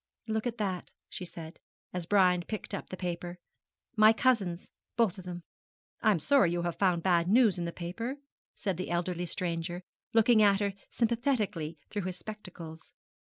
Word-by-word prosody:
'Look 220 +1 -1
at 240 -1 -3
that,' 190 -5 -2 0.2
she 180 - -5
said, 165 -2 -9 0.3
as 180 -2 -4
Brian 180 -3 +4
picked 210 +3 -5
up - - -4
the 185 - -6
paper; 175 -1 -4 0.6
'my 215 0 +7
cousins, 205 -8 +1 0.3
both 220 -6 +2
of 185 - -10
them.' 175 -1 -6 0.6
'I - - +4
am - - +1
sorry 260 - +4
you 175 0 -1
have 175 -1 -1
found 180 -4 +2
bad 175 -2 +3
news 215 -2 +5
in 170 - -1
the 170 - -2
paper,' 225 +11 -4 0.4
said 195 -5 -2
the 185 - -4
elderly 175 0 -1
stranger, 175 +1 -2 0.3
looking 225 0 +5
at 200 -2 +5
her 200 -1 0 0.2
sympathetically 225 - 0
through 205 - -1
his 185 -1 -4
spectacles. 180 -7 -9
185 Hz, 170 wpm, -30 LUFS, 175-215 Hz, 0.6 s, my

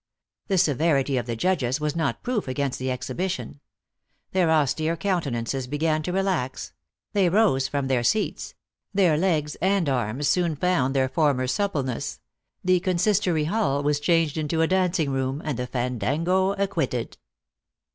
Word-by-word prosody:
The 195 - +1
severity 145 -3 +2
of 120 -1 -2
the 115 - -2
judges 135 -2 0
was 150 0 -2
not 160 -4 -1
proof 245 - -1
against 135 +1 -2
the 130 0 -2
exhibition. 145 +6 -3 0.7
Their 185 -3 +2
austere 155 +1 +1
countenances 135 - -2
began 155 +3 0
to 180 - -3
re 195 +1 +1
lax; 130 - -2 0.4
they 195 -4 +3
rose 170 -10 +3
from 140 0 -2
their 130 -2 +1
seats; 210 - -1 0.4
their 180 -6 +4
legs 155 -3 0
and 190 -3 +2
arms 130 +1 -1
soon 170 -2 +1
found 145 -5 +1
their 130 -1 +3
former 140 -3 +1
suppleness; 135 - -2 0.4
the 185 0 +3
consistory 180 -2 +1
hall 150 -5 0
was 145 0 +1
changed 165 0 +1
into 155 +1 0
a - - +2
dancing 180 -5 +1
room, 135 +1 -1
and 145 -5 -2
the 125 - -2
fan 125 -1 -2
dango 175 - +1
acquitted. 195 - -2
155 Hz, 155 wpm, -25 LUFS, 130-180 Hz, 0.7 s, their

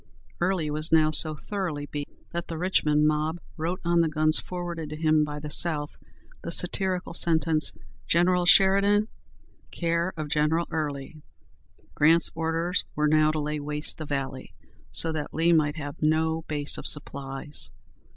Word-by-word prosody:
Early 175 -4 -1
was 155 +1 -2
now 155 -1 +4
so 155 0 +4
thoroughly 170 -5 -4
beaten, 145 0 -7 0.2
that 170 0 -5
the 165 - -6
Richmond 150 -4 +1
mob 155 +2 0 0.2
wrote 170 +3 -3
on 170 0 +3
the 165 - +1
guns 155 0 +3
forwarded 175 -3 -6
to 155 - -6
him 155 -1 +2
by 150 0 -5
the 150 0 -7
South 150 -2 +3 0.5
the 170 - -6
satirical 180 +1 +1
sentence, 160 -2 +2 0.4
"General 175 +1 +2
Sheridan, 200 +3 +4 0.6
care 170 +1 -1
of 155 -1 -4
General 150 +3 +1
Early!" 150 -1 -5 0.7
Grant's 165 +3 +4
orders 165 +3 -1
were 150 0 +1
now 155 0 +3
to 155 0 -1
lay 150 0 -3
waste 150 +2 -4
the 155 - -6
valley, 135 -2 -5 0.4
so 165 - 0
that 155 -2 -5
Lee 165 +2 +3
might 150 -2 +2
have 145 -3 -8
no 160 +1 +1
base 145 -1 0
of - - -2
supplies. 140 0 0
155 Hz, 155 wpm, -26 LUFS, 150-170 Hz, 0.7 s, now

